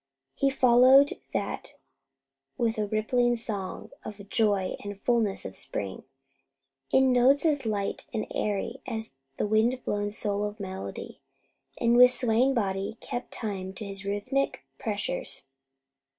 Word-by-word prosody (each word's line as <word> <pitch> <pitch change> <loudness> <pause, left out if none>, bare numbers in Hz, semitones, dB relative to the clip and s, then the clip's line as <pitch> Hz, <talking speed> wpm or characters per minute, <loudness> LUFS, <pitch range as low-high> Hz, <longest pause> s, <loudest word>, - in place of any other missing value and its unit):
He 275 - +2
followed 260 +2 +6 0.2
that - - -3 0.8
with 230 -3 0
a 210 - 0
rippling 240 +3 +2
song 210 -5 -5
of 210 -2 -7
the 200 - -10
joy 200 -2 +1
and 205 -1 -6
fulness 225 -4 0
of 95 - -6
spring, 95 -2 -4 0.9
in 265 0 +5
notes 270 +5 +4
as 285 -6 +1
light 200 -2 -2
and 220 -3 -2
airy 210 +5 -2
as 220 - -4 0.2
the - - 0
wind 220 +4 +2
blown 205 0 -1
soul 205 -1 -2
of 210 +1 -4
melody, 190 -1 -6 0.6
and 235 0 +3
with 250 0 +9
swaying 250 +2 +2
body 195 -1 -1
kept 245 - -5
time 190 -4 -4
to 210 +3 -7
his 195 0 -6
rhythmic 205 +8 -1 0.2
measures. 205 - -2
220 Hz, 135 wpm, -28 LUFS, 200-245 Hz, 0.9 s, with